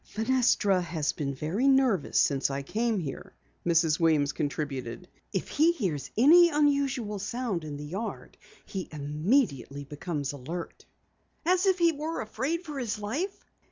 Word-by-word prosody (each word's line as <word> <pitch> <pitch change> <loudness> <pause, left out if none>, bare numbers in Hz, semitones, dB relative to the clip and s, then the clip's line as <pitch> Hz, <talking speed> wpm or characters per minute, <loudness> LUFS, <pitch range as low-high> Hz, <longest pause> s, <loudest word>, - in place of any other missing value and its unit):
"Fenestra 225 -5 +2
has 160 -4 -2
been 140 -2 -3
very 170 - 0
nervous 265 - +3
since 140 -2 +2
I 140 0 -3
came 225 - 0
here," 150 -7 -6 0.3
Mrs. 165 -2 +3
Weems 155 -4 +3
contributed. 145 0 -4 0.2
"If - - -2
he 320 +3 +3
hears 165 - -3
any 340 +8 +7
unusual 280 -8 +1
sound 210 -4 -3
in 150 -2 -6
the 145 - -7
yard 195 +9 -5 0.3
he 190 -3 -5
immediately 150 - 0
becomes 145 0 -4
alert." 160 +6 -7 0.6
"As 365 +2 +3
if 380 -1 +4
he 340 -1 +4
were 315 +2 -4
afraid 265 +11 -2
for 300 -5 -6
his 225 -4 -2
life?" 275 - -4
195 Hz, 145 wpm, -28 LUFS, -, 0.6 s, any